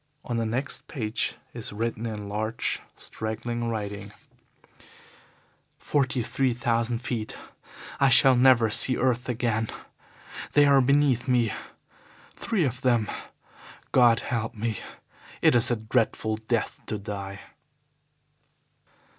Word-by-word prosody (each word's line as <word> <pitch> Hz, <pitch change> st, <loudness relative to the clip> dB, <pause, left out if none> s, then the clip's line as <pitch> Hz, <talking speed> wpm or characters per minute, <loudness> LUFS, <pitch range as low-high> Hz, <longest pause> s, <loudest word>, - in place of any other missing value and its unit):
On 120 Hz, -, -2 dB
the 115 Hz, -1 st, 0 dB
next 130 Hz, +5 st, -3 dB
page 110 Hz, -5 st, -2 dB, 0.2 s
is -, -, -6 dB
written, 115 Hz, +2 st, -3 dB
in 105 Hz, -2 st, -5 dB
large, 110 Hz, +2 st, -2 dB
straggling 120 Hz, +2 st, -4 dB
writing: 105 Hz, -2 st, -5 dB, 1.7 s
"Forty 130 Hz, -3 st, 0 dB
three 125 Hz, +2 st, 0 dB
thousand 115 Hz, 0 st, 0 dB
feet. 115 Hz, -4 st, -3 dB, 0.6 s
I 140 Hz, -1 st, +5 dB
shall 130 Hz, +1 st, +7 dB
never 125 Hz, -3 st, +5 dB
see 130 Hz, +3 st, +4 dB
earth 125 Hz, -1 st, 0 dB
again. 115 Hz, -2 st, -1 dB, 0.8 s
They 145 Hz, 0 st, +6 dB
are 140 Hz, -1 st, +6 dB
beneath 135 Hz, -2 st, +2 dB
me, 120 Hz, -4 st, +2 dB, 0.8 s
three 220 Hz, -7 st, -1 dB
of 125 Hz, 0 st, -3 dB
them. 120 Hz, -4 st, +2 dB, 0.8 s
God 120 Hz, -3 st, +5 dB
help 115 Hz, 0 st, -3 dB
me; 110 Hz, -1 st, -2 dB, 0.6 s
it -, -, +4 dB
is 120 Hz, +1 st, +5 dB
a 120 Hz, -, +2 dB
dreadful 110 Hz, -1 st, 0 dB
death 110 Hz, +1 st, -2 dB
to 105 Hz, -, -2 dB
die!" 100 Hz, -1 st, -6 dB
115 Hz, 115 wpm, -26 LUFS, 110-125 Hz, 1.7 s, shall